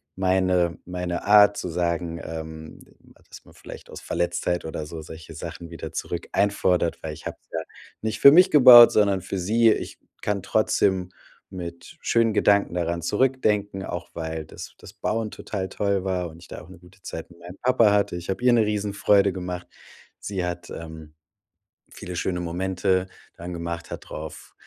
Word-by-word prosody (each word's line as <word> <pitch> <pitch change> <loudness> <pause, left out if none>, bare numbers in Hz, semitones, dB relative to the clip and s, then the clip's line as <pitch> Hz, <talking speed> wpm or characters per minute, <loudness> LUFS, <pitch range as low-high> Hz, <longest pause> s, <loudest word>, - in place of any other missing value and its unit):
meine 95 -3 +1
meine 90 -1 -4
Art 105 0 +6
zu 90 - -4
sagen, 85 0 -2
ähm, 80 -1 -8 0.5
dass - - -13
man - - -18
vielleicht - - -12
aus - - -9
Verletztheit 85 0 -2
oder 80 -1 -5
so 80 0 -7
solche 80 +1 -11
Sachen 85 +1 -8
wieder 80 -2 -8
zurück 85 0 -5
einfordert, 95 -4 +1
weil 80 -1 -4
ich - - -9
hab's - - -9
ja 80 - -1 0.4
nicht 110 0 -3
für 140 - +9
mich 180 +5 +7
gebaut, 125 -5 +10
sondern 100 -3 +2
für 95 - -5
sie. 110 +5 +3
Ich - - -4 0.2
kann 105 -1 -1
trotzdem 95 -3 +1 0.4
mit 85 -2 -8
schönen 115 -2 +2
Gedanken 100 -4 +3
daran 85 -1 -1
zurückdenken, 105 -2 0
auch 85 -2 -6
weil 80 -1 -5
das - - -10
das - - -13
Bauen 110 0 -2
total 95 -3 -5
toll 100 -2 -1
war 90 -2 -2
und 80 - -14
ich 85 - -15
da - - -8
auch 80 - -15
'ne 95 - -13
gute 90 +2 -20
Zeit 80 - -7
mit 85 - -18
meinem 90 +2 -11
Papa 120 -4 +4
hatte. 100 -3 +1
Ich 90 +1 -9
hab 95 - -2
ihr 125 0 +4
'ne 115 -2 +4
Riesenfreude 100 -1 +2
gemacht. 90 -1 -6 0.5
Sie 95 -3 -3
hat, 90 0 -5
ähm, 80 -2 -9 0.8
viele 90 +1 -8
schöne 90 +1 -2
Momente 95 +2 -1 0.3
dran 85 +1 -8
gemacht, 85 0 -5
hat - - -8
drauf 80 +1 -8
90 Hz, 175 wpm, -24 LUFS, 85-100 Hz, 0.8 s, gebaut